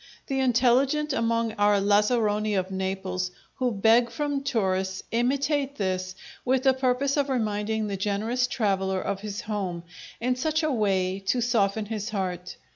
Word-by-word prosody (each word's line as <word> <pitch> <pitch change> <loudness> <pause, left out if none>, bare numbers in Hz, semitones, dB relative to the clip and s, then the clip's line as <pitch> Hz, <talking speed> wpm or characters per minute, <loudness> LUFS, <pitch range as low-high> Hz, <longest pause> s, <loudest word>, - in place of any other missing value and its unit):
The 270 -2 -2
intelligent 265 +4 +2
among 230 -1 +1
our 205 0 +4
lazzaroni 210 +1 +2
of 185 0 -1
Naples, 190 -1 -2 0.3
who 250 -1 +1
beg 225 +3 +4
from 290 -2 -2
tourists, 190 -7 -1
imitate 275 +4 0
this, 185 -3 -2 0.3
with 260 0 +1
the 265 -1 +5
purpose 260 +2 0
of 285 -1 +1
reminding 220 -3 -1
the 200 -2 -3
generous 215 +6 0
traveller 190 -5 0
of 195 - -3
his 205 0 -5
home, 190 -5 -3 0.4
in 250 +2 0
such 315 +5 0
a 310 - +1
way 195 -5 +1
to 245 - +2
soften 220 -3 +1
his 215 0 -4
heart. 180 -3 -3
220 Hz, 150 wpm, -26 LUFS, 195-255 Hz, 0.4 s, the